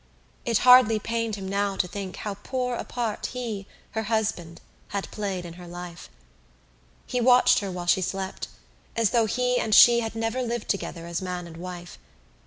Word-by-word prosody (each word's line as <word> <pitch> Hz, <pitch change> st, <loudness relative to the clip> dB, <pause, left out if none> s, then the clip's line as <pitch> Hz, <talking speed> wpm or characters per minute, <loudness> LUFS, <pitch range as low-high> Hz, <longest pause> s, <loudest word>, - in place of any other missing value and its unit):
It 230 Hz, -3 st, +2 dB
hardly 250 Hz, -3 st, +8 dB
pained 230 Hz, 0 st, -2 dB
him 195 Hz, -2 st, -6 dB
now 200 Hz, 0 st, 0 dB
to 185 Hz, -, 0 dB
think 190 Hz, 0 st, -6 dB
how 210 Hz, -, -4 dB
poor 250 Hz, +4 st, -3 dB
a -, -, -4 dB
part 235 Hz, -4 st, -3 dB
he, 225 Hz, -6 st, -4 dB, 0.2 s
her 220 Hz, -, -2 dB
husband, 210 Hz, -7 st, -1 dB, 0.3 s
had 200 Hz, 0 st, -4 dB
played 195 Hz, -4 st, -3 dB
in 170 Hz, -, -8 dB
her 175 Hz, -, -10 dB
life. 175 Hz, -1 st, -9 dB, 1.0 s
He 250 Hz, -, -1 dB
watched 250 Hz, 0 st, +6 dB
her 200 Hz, -, -4 dB
while 180 Hz, -1 st, -5 dB
she 175 Hz, +2 st, +3 dB
slept 190 Hz, +1 st, -3 dB, 0.5 s
as 230 Hz, -3 st, +2 dB
though 230 Hz, -3 st, +3 dB
he 250 Hz, +2 st, +1 dB
and 215 Hz, -1 st, +2 dB
she 235 Hz, -1 st, +8 dB
had 225 Hz, -1 st, -4 dB
never 225 Hz, +3 st, -1 dB
lived 240 Hz, -2 st, -3 dB
together 170 Hz, -4 st, -3 dB
as 170 Hz, +1 st, -3 dB
man 180 Hz, -1 st, -4 dB
and 165 Hz, -1 st, -11 dB
wife. 175 Hz, 0 st, -8 dB
205 Hz, 185 wpm, -26 LUFS, 180-235 Hz, 1.0 s, hardly